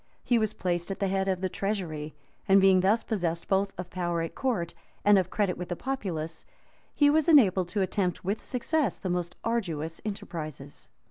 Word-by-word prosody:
He 240 -2 +3
was 215 -1 0
placed 175 -1 -2
at 195 - -4
the 195 -2 +1
head 195 0 0
of 185 -1 0
the 190 - +1
treasury,[*] 175 -7 -3 0.3
and 195 0 +7
being 190 -1 +6
thus 205 +5 +3
possessed 170 -6 -2
both 195 0 +1
of 180 0 -6
power 175 -2 -1
at 165 - -5
court, 210 -11 -1 0.3
and 205 -1 +7
of 185 -1 -1
credit 200 -4 0
with 180 - -5
the 175 - -1
populace, 170 -11 -4 0.5
he 290 -1 +5
was 315 +1 +3
enabled 195 - +5
to 195 +3 -1
attempt 185 -1 -1
with 200 +3 -1
success 255 - 0
the 185 - -3
most 175 0 -2
arduous 165 -9 -2
enterprises. 155 -9 -6
190 Hz, 190 wpm, -28 LUFS, 175-210 Hz, 0.5 s, and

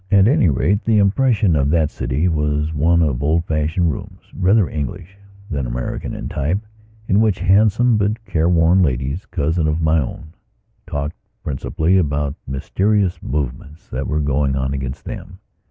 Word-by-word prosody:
At 100 -1 +5
any 115 - +4
rate, 90 - +1
the 115 -2 +2
impression 105 -2 +3
of 70 -1 +2
that 80 -1 +2
city 65 +7 -1
was 75 -1 0
one 85 +3 +3
of 70 -5 -1
old 80 +4 +1
fashioned 80 +2 0
rooms, - - -8
rather 95 +1 +3
English 90 +5 -5 0.4
than 70 -5 -2
American - - -4
in - - -5
type, 80 +8 -1 0.5
in 100 +2 +3
which 110 -4 +2
handsome 105 +5 +3
but 105 +2 -1
careworn 85 0 +3
ladies, 70 +2 -1
cousins 80 +1 0
of 75 +1 0
my 80 0 +2
own, 80 +3 -6 0.5
talked 70 +3 -4 0.3
principally 80 +6 0
about 75 -3 -1
mysterious 95 +8 0
movements 70 +2 -5
that 65 0 -3
were 75 +1 0
going 70 -1 0
on 65 0 -1
against 65 -1 -5
them. - - -8
80 Hz, 155 wpm, -19 LUFS, 70-95 Hz, 0.5 s, At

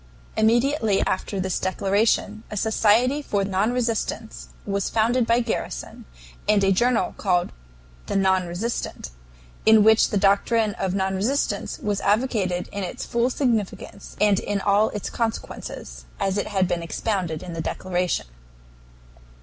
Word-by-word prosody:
Immediately 225 -1 +2
after 190 +1 -2
this 190 -1 -1
declaration 205 +2 +1
a 210 - -5
Society 225 +6 +3
for 205 -8 -1
Non 195 +3 0
resistance 230 - -2 0.2
was 200 -1 -1
founded 230 +2 +2
by 235 +1 +3
Garrison, 220 - -4 0.4
and 210 -2 +4
a 195 - +4
journal 235 +5 +2
called 180 -3 +1 0.6
the - - -3
NON 190 -2 +2
RESISTANT, 175 - -4 0.5
in 220 -1 +6
which 220 +1 +5
the 205 - 0
doctrine 205 +2 +2
of 190 -1 -1
non 190 -1 0
resistance 235 +10 -1
was 205 -1 -2
advocated 205 -5 0
in 200 -1 -4
its 180 - -5
full 235 +1 +1
significance 235 -7 -2
and 205 -2 +4
in 205 -1 -2
all 205 +2 +3
its 210 - -5
consequences, 65 - -5
as 195 -1 0
it - - -2
had 190 -3 +1
been 175 -1 -1
expounded 175 -1 -2
in 180 -2 -7
the 165 - -3
declaration. 180 +1 -2
205 Hz, 140 wpm, -24 LUFS, 190-225 Hz, 0.6 s, in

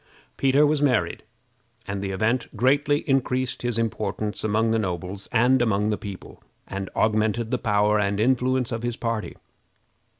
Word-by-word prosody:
Peter 135 +2 +4
was 150 0 +1
married, 120 - +1 0.7
and 100 0 -3
the 100 - -3
event 115 +5 0
greatly 145 +5 +2
increased 130 -2 0
his 120 -2 -1
importance 105 -2 -2
among 110 +1 +1
the 115 - +2
nobles 95 0 -4
and 125 +3 +4
among 105 -2 +1
the - - +1
people, 100 -1 -9 0.3
and 95 -1 -5
augmented 110 +1 +1
the - - 0
power 105 -1 +2
and 100 0 0
influence 130 +1 +1
of 115 -1 -3
his 120 0 -3
party. 115 -2 -3
110 Hz, 155 wpm, -24 LUFS, 105-125 Hz, 0.7 s, Peter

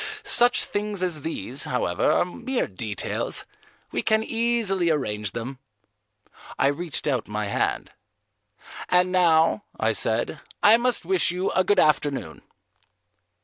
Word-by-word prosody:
Such 245 -11 +4
things 205 -2 -3
as 170 -5 -1
these, 140 -3 -1
however, 90 -9 0
are - - +2
mere 255 +8 -3
details; 105 +1 -3 0.5
we - - -1
can 220 0 +1
easily 225 -6 0
arrange 105 -9 -2
them." 125 +3 -6 1.0
I 135 - +3
reached 155 +2 -2
out 130 -6 -1
my 105 0 -3
hand. 100 - -2 1.0
"And 180 0 +3
now," 170 +1 +3 0.2
I - - +2
said, - - 0 0.2
"I 215 +2 +7
must 245 +1 +2
wish 380 -1 +2
you 180 +2 -2
a 185 - +2
good 205 - +2
afternoon." 145 - 0
175 Hz, 130 wpm, -24 LUFS, 130-210 Hz, 1.0 s, I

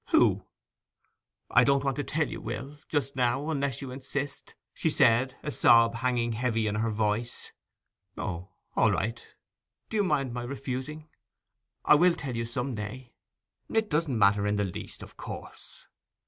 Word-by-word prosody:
'Who?' - - +4 1.0
'I 125 - +6
don't 140 +1 +3
want 135 -2 0
to 145 - -1
tell 155 +2 0
you, - - -6
Will, 145 +2 -6
just 140 -2 -1
now, 130 +5 +1
unless 140 -3 -1
you 130 - -6
insist!' 140 +2 -4 0.2
she - - 0
said, 125 +3 +3
a 150 - -3
sob 115 -3 +5
hanging 120 -1 0
heavy 115 -1 0
in 105 - 0
her 110 +2 0
voice. 110 +2 -2 0.7
'O, 90 -2 -4 0.3
all - - +4
right.' 115 +4 -3 0.6
'Do 220 - 0
you 205 - +3
mind 140 -8 0
my 120 - -3
refusing? 135 +4 -5 0.8
I - - +7
will 170 +3 +5
tell 130 -4 -5
you 115 0 -1
some 125 +3 -3
day.' 115 +4 -6 0.6
'It 220 -3 +1
doesn't 150 -5 +1
matter 100 0 +4
in 105 - +1
the 105 0 +1
least, 90 - -7
of - - -13
course. - - -9
125 Hz, 160 wpm, -28 LUFS, 115-140 Hz, 1.0 s, I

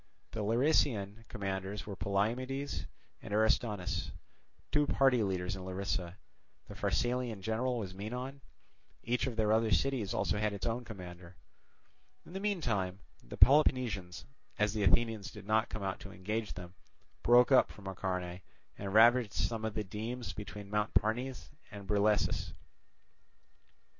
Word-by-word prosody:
The 115 - -5
Larisaean 115 -3 +1
commanders 95 0 -4
were 100 - -6
Polymedes 125 +9 -1 0.3
and 110 - -9
Aristonus, 105 -4 +1 0.6
two 150 -1 +3
party 135 -4 +4
leaders 95 -2 -1
in 95 - -7
Larisa; 95 -1 -3 0.5
the - - -9
Pharsalian 120 -4 -1
general 120 +4 0
was 95 -5 -4
Menon; 125 +8 -5 0.6
each 120 +1 0
of 125 - -3
the 110 -1 +1
other 110 0 +3
cities 110 +3 +1
had - - -2
also 105 - +1
its 105 -2 -1
own 120 +2 -1
commander. 90 -4 -9 0.9
In - - -13
the 190 - -3
meantime 115 - -1 0.2
the - - -9
Peloponnesians, 125 -10 +4 0.3
as 105 -1 +2
the 110 - -1
Athenians 105 +2 +2
did 105 -2 -11
not 110 +2 +2
come 110 - -5
out 95 -1 -2
to 100 - -10
engage 105 +4 -3
them, 90 0 -9 0.5
broke 120 +2 +6
up 130 - +6
from 100 - -13
Acharnae 90 -2 -3 0.4
and 100 0 -4
ravaged 115 -1 +6
some 110 +5 -1
of 110 -1 -2
the 105 - -1
demes 110 +2 -5
between 105 -1 -8
Mount 105 0 0
Parnes 125 +5 0 0.2
and 100 -2 -9
Brilessus. 105 +1 +1
105 Hz, 145 wpm, -33 LUFS, 95-120 Hz, 0.9 s, broke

